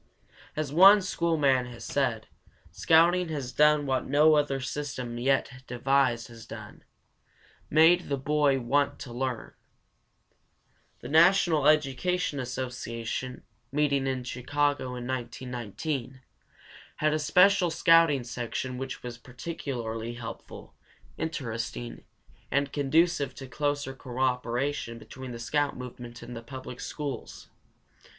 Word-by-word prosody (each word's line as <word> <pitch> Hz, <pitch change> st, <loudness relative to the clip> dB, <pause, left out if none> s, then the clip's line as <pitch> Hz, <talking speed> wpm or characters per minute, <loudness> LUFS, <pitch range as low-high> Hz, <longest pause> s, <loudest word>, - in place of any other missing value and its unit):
As 150 Hz, -2 st, -3 dB
one 195 Hz, +4 st, +8 dB
school 170 Hz, -3 st, 0 dB
man 135 Hz, -4 st, +3 dB
has 120 Hz, -1 st, -9 dB
said, 125 Hz, -6 st, -1 dB, 0.5 s
"Scouting 170 Hz, +2 st, +4 dB
has 140 Hz, -5 st, -4 dB
done 150 Hz, +1 st, +4 dB
what 130 Hz, -1 st, -1 dB
no 150 Hz, +3 st, +5 dB
other 145 Hz, -2 st, +1 dB
system 130 Hz, -3 st, -4 dB
yet 130 Hz, 0 st, 0 dB
devised 125 Hz, -1 st, +1 dB
has 115 Hz, -1 st, -12 dB
done -, -, -10 dB, 0.9 s
made 165 Hz, +3 st, +5 dB
the 140 Hz, -, 0 dB
boy 145 Hz, 0 st, +2 dB
want 140 Hz, +3 st, +1 dB
to 120 Hz, -, -7 dB
learn." 125 Hz, -1 st, -3 dB, 1.5 s
The -, -, -7 dB
National 165 Hz, -2 st, +4 dB
Education 155 Hz, +2 st, +1 dB
Association, 125 Hz, -1 st, -4 dB, 0.3 s
meeting 140 Hz, -1 st, +1 dB
in 130 Hz, -1 st, -2 dB
Chicago 130 Hz, +1 st, -1 dB
in 120 Hz, -1 st, -6 dB
1919, 125 Hz, +1 st, -4 dB, 0.7 s
had 155 Hz, 0 st, +1 dB
a 155 Hz, -, +1 dB
special 180 Hz, +4 st, +4 dB
scouting 165 Hz, -4 st, +4 dB
section 125 Hz, +1 st, -4 dB
which 135 Hz, -1 st, -6 dB
was 120 Hz, -1 st, -7 dB
particularly 120 Hz, -4 st, -5 dB
helpful, 115 Hz, -1 st, -9 dB, 0.5 s
interesting, 115 Hz, -, -4 dB, 0.5 s
and 140 Hz, +1 st, 0 dB
conducive 145 Hz, -1 st, +2 dB
to 135 Hz, -, -8 dB
closer 145 Hz, 0 st, -2 dB
cooperation 125 Hz, 0 st, -2 dB
between 130 Hz, +3 st, -10 dB
the 120 Hz, -, -6 dB
scout 140 Hz, +6 st, -1 dB
movement 120 Hz, -1 st, -9 dB
and 120 Hz, +1 st, -8 dB
the 115 Hz, -, -6 dB
public 130 Hz, +1 st, -9 dB
schools. 140 Hz, -6 st, -6 dB
135 Hz, 115 wpm, -28 LUFS, 125-150 Hz, 1.5 s, one